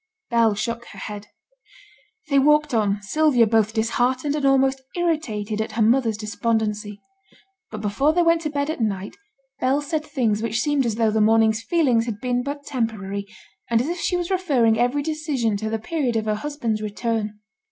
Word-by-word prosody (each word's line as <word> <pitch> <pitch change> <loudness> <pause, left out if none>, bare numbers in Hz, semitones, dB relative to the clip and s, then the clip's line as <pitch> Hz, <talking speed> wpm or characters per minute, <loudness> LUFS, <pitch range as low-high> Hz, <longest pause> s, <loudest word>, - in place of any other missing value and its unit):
Bell 230 -3 +3
shook 235 +2 -3
her - - -13
head. 210 -1 -7 1.0
They 280 -1 +4
walked 300 0 +3
on, 205 -2 +1
Sylvia 270 +1 +3
both 220 -1 +2
disheartened 245 +5 0
and 285 -2 +1
almost 270 0 +3
irritated 225 - -1
at 220 - -4
her 225 - -1
mother's 230 -1 +2
despondency. 215 -1 -2 0.7
But 215 -1 -7
before 215 +9 +1
they 350 +2 +2
went 335 0 +3
to 305 - -2
bed 285 +1 -1
at 315 - -5
night 200 -3 -2 0.4
Bell 265 +3 +2
said 300 +1 -2
things 245 -9 0
which 230 0 -1
seemed 290 -4 +1
as 220 - -1
though 225 -1 +2
the 220 0 +1
morning's 220 +1 +3
feelings 250 -8 +2
had 215 -3 -4
been 245 0 0
but 285 +2 -5
temporary, 205 -6 -3 0.4
and 230 -1 +3
as 255 +7 -1
if 350 0 -3
she 360 - 0
was 350 +1 -3
referring 265 -12 +2
every 250 +4 +1
decision 295 -8 -1
to 220 +2 -3
the 225 - -1
period 255 +1 -2
of 220 -1 0
her 215 - +1
husband's 230 -3 -3
return. 215 0 -2
235 Hz, 185 wpm, -23 LUFS, 215-290 Hz, 1.0 s, They